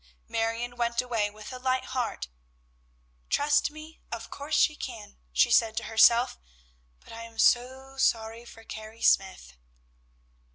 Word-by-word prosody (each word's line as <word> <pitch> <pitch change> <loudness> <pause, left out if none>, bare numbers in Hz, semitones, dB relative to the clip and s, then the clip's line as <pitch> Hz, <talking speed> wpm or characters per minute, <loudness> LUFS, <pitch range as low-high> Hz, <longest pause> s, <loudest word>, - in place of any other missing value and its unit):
Marion 230 +2 -2
went 235 -1 0
away 230 -4 0
with 215 +4 -10
a 255 - -7
light 255 0 0
heart. 250 - -3 1.0
"Trust 290 0 +2
me? 310 +1 -12
of 230 0 -6
course 290 +2 -3
she 305 - +4
can," 225 - -8
she - - +3
said 225 -1 +3
to - - -1
herself; 235 +2 +4 0.6
"but - - -14
I 230 - -8
am 230 0 -11
so 260 +3 +2
sorry 225 -2 0
for 225 -1 -14
Carrie 220 +1 -9
Smyth." 190 - +2
235 Hz, 140 wpm, -28 LUFS, 225-260 Hz, 1.0 s, she